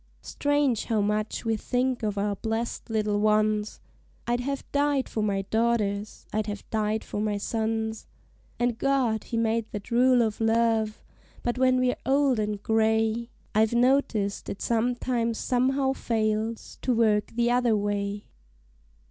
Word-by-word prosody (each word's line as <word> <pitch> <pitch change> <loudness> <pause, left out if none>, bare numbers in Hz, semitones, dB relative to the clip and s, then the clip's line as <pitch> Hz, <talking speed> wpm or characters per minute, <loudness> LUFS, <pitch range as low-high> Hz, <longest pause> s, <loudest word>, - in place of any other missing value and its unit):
Strange 290 -5 0
how 225 -3 0
much 210 +3 -1
we 225 0 +1
think 250 +3 -1
of 210 -2 -2
our 200 0 0
blessed 225 +3 -3
little 210 -2 0
ones! 215 0 +1 0.5
I'd 240 0 0
have 275 +2 -3
died 285 -2 +1
for 220 - -3
my 200 -2 0
daughters, 215 -1 -1
I'd 215 0 -1
have 205 -1 -6
died 215 0 0
for 205 - -4
my 210 -1 0
sons; 220 +1 -2 0.5
And 240 -1 0
God 260 -6 +1
he 230 - -3
made 225 0 +1
that 205 +3 -6
rule 250 0 +5
of 220 0 -2
love; 225 -1 +1 0.4
but 240 +1 -1
when 255 0 +4
we're 255 0 +1
old 270 -3 +2
and 210 -1 -2
gray, 220 +1 +1 0.2
I've 220 +1 +3
noticed 240 -5 +1
it 195 - -5
sometimes 235 0 0
somehow 265 +2 +1
fails 220 -2 -2
to 250 - +1
work 215 -2 +2
the 240 0 +2
other 245 -2 +3
way. 205 0 -2
225 Hz, 150 wpm, -26 LUFS, 215-245 Hz, 0.5 s, rule